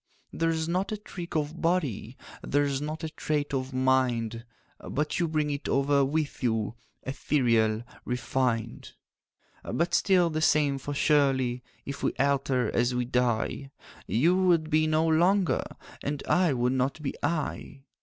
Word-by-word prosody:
'There's 165 -1 0
not 185 +4 -1
a 215 - -2
trick 180 -4 -8
of 155 +2 -2
body, 140 - -1 0.2
There's 140 -1 0
not 155 +2 -5
a 160 - -2
trait 150 -2 -2
of 130 0 -2
mind, 125 -3 +1 0.4
But 150 +2 -2
you 170 - +1
bring 155 -2 0
it 145 0 -4
over 140 +1 +3
with 150 +2 -2
you, 110 -3 0 0.3
Ethereal, 115 -5 +1 0.2
refined, 120 -1 -2 0.7
'But 170 +1 -1
still 180 -3 +3
the 155 0 -2
same; 145 -3 +3
for 145 +2 -5
surely 135 -5 +2 0.2
If 140 - -6
we - - 0
alter 135 -4 +1
as 120 +1 +1
we 125 0 0
die, 125 +2 0 0.4
You 160 +11 +3
would 170 -4 +2
be 155 - +4
you 155 - +2
no 155 +1 +2
longer, 175 +4 +3 0.4
And 145 0 -3
I 180 -3 +3
would 125 0 +1
not 130 +3 0
be 135 - -2
I. 150 -3 -3
140 Hz, 150 wpm, -28 LUFS, 125-160 Hz, 0.7 s, be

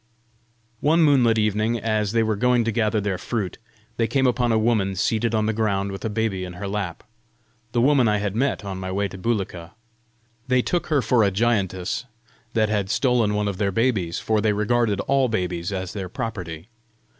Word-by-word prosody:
One 160 +3 +3
moonlit 125 -7 +4
evening, 110 +2 +1
as 110 -2 0
they 115 0 +2
were 110 -1 0
going 125 +2 +2
to 115 - 0
gather 110 -1 +1
their 100 -3 -2
fruit, 105 -2 -3 0.4
they 115 - +1
came 130 +4 +1
upon 125 -1 +2
a 110 - +3
woman 110 -4 +1
seated 115 +4 0
on 110 0 +1
the 110 - 0
ground 100 -3 0
with 95 - -7
a 110 - -1
baby 105 -3 -1
in 90 -1 -6
her 100 +3 -6
lap 100 -4 -4 0.7
the 120 - +1
woman 135 -3 +4
I 105 0 +2
had 100 -1 -2
met 130 -3 0
on 95 -1 -5
my 95 0 -4
way 100 +1 0
to - - -9
Bulika. 95 -6 -3 0.7
They 125 -1 +3
took 175 - -1
her 145 -5 +2
for 120 -3 +3
a 100 - +4
giantess 100 -1 0 0.5
that 110 -1 +2
had 100 -3 -1
stolen 120 -5 +2
one 105 0 0
of 100 -2 -3
their 100 -1 0
babies, 100 -6 0
for 110 -1 0
they 105 0 +2
regarded 105 0 +1
all 135 -1 +2
babies 90 -4 -2
as 95 -2 -4
their 95 -3 -5
property. 90 -6 -5
105 Hz, 200 wpm, -23 LUFS, 95-120 Hz, 0.7 s, moonlit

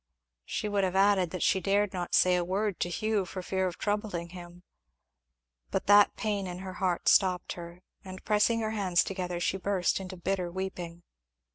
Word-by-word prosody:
She 215 - -3
would 205 -1 0
have 185 0 -1
added 195 -2 +3
that 185 0 -4
she 190 - +3
dared 200 0 +1
not 180 -2 -2
say 180 0 +5
a 175 - +1
word 195 +2 -1
to 175 - -1
Hugh 215 +3 0
for 185 +1 -7
fear 190 0 -1
of 175 - -6
troubling 205 -5 -2
him. 175 0 -11 1.1
But - - -2
that 205 0 +6
pain 205 -3 -2
at 180 0 -6
her 190 -1 -6
heart 180 -2 0
stopped 185 -2 +3
her, 170 +1 -10 0.2
and 185 0 -10
pressing 215 +2 +2
her 220 0 -1
hands 190 -5 +2
together 180 -2 -4
she 180 +2 0
burst 190 -1 0
into 185 -1 -7
bitter 180 0 -2
weeping. 175 -2 -6
185 Hz, 185 wpm, -29 LUFS, 180-200 Hz, 1.1 s, that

